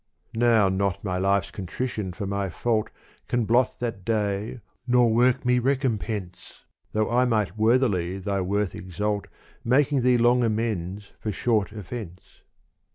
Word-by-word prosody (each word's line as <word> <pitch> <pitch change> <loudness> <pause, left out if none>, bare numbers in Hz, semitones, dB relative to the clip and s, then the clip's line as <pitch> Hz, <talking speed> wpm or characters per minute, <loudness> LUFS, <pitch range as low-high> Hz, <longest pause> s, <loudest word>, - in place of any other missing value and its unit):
Now 115 -3 +4
not 95 -1 -1
my 90 -3 -2
life's 100 0 +1
contrition 100 +1 -4
for 100 +3 -5
my 100 0 -2
fault 110 +4 -1 0.4
Can 120 -2 0
blot 120 +4 +2
that 115 -6 -4
day 105 +2 -1 0.3
nor 120 -2 +4
work 125 +2 +3
me 125 0 +3
recompense, 110 -8 -2 0.3
Though 110 +1 0
I 125 +1 +3
might 110 -5 0
worthily 105 -6 +2
thy 100 0 -2
worth 100 +1 -1
exalt 105 +3 -3 0.4
Making 135 +3 +3
thee 125 0 +4
long 120 +1 +4
amends 105 -4 -2
for 110 - -3
short 105 -1 0
offence. 100 -3 -9
110 Hz, 140 wpm, -25 LUFS, 100-120 Hz, 0.4 s, Now